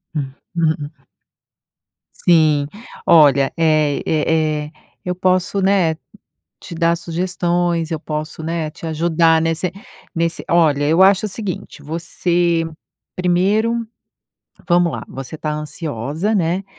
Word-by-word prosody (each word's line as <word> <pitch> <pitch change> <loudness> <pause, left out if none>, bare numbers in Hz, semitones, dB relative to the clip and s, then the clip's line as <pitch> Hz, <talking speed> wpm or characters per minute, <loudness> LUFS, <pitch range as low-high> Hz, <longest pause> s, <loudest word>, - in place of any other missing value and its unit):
Ah. 145 - 0 0.3
Ue 165 -2 +2 0.2
a 155 - -15 1.2
Sim. 155 -4 +4 0.4
Olha, 140 -5 +5
eh, 155 -3 +2
eh, 155 -1 +1
eh, - - -14 0.3
eu 180 0 -2
posso, 185 +1 +1
né, 185 -5 +2 0.6
te 170 - -9
dar 170 0 +2
sugestões, 175 -1 -1
eu 160 - -2
posso, 155 0 -5
né, 165 -1 -2
te 165 - -10
ajudar 160 0 +2
nesse 165 +2 -1 0.4
nesse 165 0 -1
Olha, 155 -4 +3
eu 165 +5 +3
acho 195 +2 +4
o 210 - -3
seguinte: 185 -7 -5
você 170 +1 0 0.5
primeiro 210 +6 +1 0.8
vamos 175 -1 +3
lá, - - -5
você 135 +3 -7
tá 155 -1 -2
ansiosa, 150 - -3
né? 180 +1 0
165 Hz, 120 wpm, -19 LUFS, 155-180 Hz, 1.2 s, Olha